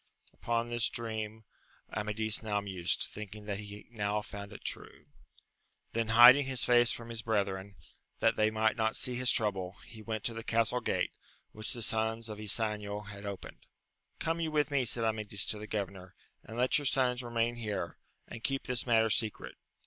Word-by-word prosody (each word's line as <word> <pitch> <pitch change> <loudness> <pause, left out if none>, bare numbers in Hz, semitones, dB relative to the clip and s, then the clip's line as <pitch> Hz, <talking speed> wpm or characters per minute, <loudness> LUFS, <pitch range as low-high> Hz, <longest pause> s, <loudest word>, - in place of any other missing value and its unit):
Upon 115 0 -1
this 120 -1 0
dream 110 -1 -4 0.5
Amadis 110 0 0
now 105 -2 0
mused, 95 -4 -1
thinking 105 0 -8
that 100 -1 -2
he 105 0 -8
now 105 -2 -1
found 100 0 -8
it 105 - -11
true. 75 +2 -6 0.9
Then 115 -1 0
hiding 125 +5 +9
his 130 -2 +2
face 120 -1 +6
from 115 0 -5
his 115 -1 -3
brethren, 100 -3 -1 0.4
that 115 0 +3
they 110 0 +3
might 110 0 +2
not 110 -1 0
see 125 - 0
his 125 +1 +3
trouble, 95 -4 +1
he^went 110 -1 -5
,to 115 - 0
the 115 0 -6
castle 115 +2 +1
gate, - - 0 0.4
which 110 +1 -3
the 120 - -4
sons 110 +1 -1
of 105 -1 -6
Ysanjo 105 -1 -1
had 100 0 -8
opened. 100 -2 -8 0.5
Come 165 +1 -1
you 165 -1 0
with 150 -1 +1
me, 140 -3 +2
said 115 0 +1
Amadis 105 -2 +1
to 105 - -2
the 105 - -7
governor, 95 -3 -5 0.3
and 110 - -9
let 125 +4 +3
your 145 - -6
sons 130 -2 +2
remain 120 0 -1
here, 105 -7 -4 0.3
and 115 - -9
keep 135 -1 0
this 125 0 -2
matter 115 -2 +4
secret. 110 -1 +1
110 Hz, 180 wpm, -32 LUFS, 105-120 Hz, 0.9 s, hiding